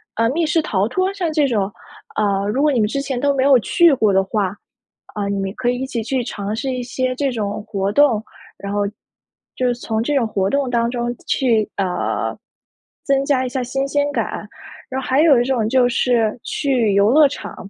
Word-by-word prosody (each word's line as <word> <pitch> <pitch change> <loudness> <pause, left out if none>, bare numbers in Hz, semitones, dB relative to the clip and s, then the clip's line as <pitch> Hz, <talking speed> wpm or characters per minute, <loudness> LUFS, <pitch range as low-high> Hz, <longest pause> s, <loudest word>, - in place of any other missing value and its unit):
呃， 230 0 +2
密 330 +2 0
室 320 +1 +2
逃 200 -7 0
脱， 370 +9 0
像 355 -5 -2
这 300 -3 +2
种 205 -5 -1 0.4
呃， 200 -1 +1
如 265 +6 0
果 300 -1 +3
你 250 - +1
们 210 - +2
之 275 +5 -2
前 270 -3 -3
都 285 +1 +2
没 260 - +1
有 275 -2 +6
去 335 - +4
过 215 -6 +2
的 190 0 +3
话， 195 -1 -2 0.6
啊， 205 -1 -3
你 200 0 -1
们 195 0 -2
可 245 -1 0
以 245 - 0
一 - - -1
起 250 -4 -3
去 250 +2 -1
尝 210 -2 -4
试 265 +3 -3
一 250 - -3
些 255 0 -2
这 275 0 0
种 210 -2 -3
活 200 -2 -1
动。 230 -3 +3 0.3
然 200 0 -6
后， 205 - 0 0.7
就 255 - 0
是 245 - +1
从 225 -2 -2
这 290 +5 -1
种 250 -5 +2
活 195 -3 -1
动 280 +1 0
当 235 -1 +1
中 240 -1 -2
去， 230 -5 +2
呃， 185 -3 -1 0.7
增 275 -1 +1
加 260 -2 +1
一 - - -3
下 260 0 -2
新 270 +3 -2
鲜 290 +1 0
感。 - - -3 0.4
然 265 +1 -3
后 - - -7
还 265 +3 +2
有 295 -6 +6
一 - - +2
种 245 -4 0
就 255 -1 +4
是 235 -2 +1
去 250 -8 0
游 200 +2 +4
乐 300 +1 +6
场。 275 - -7
245 Hz, 235 characters per minute, -19 LUFS, 215-275 Hz, 0.7 s, 有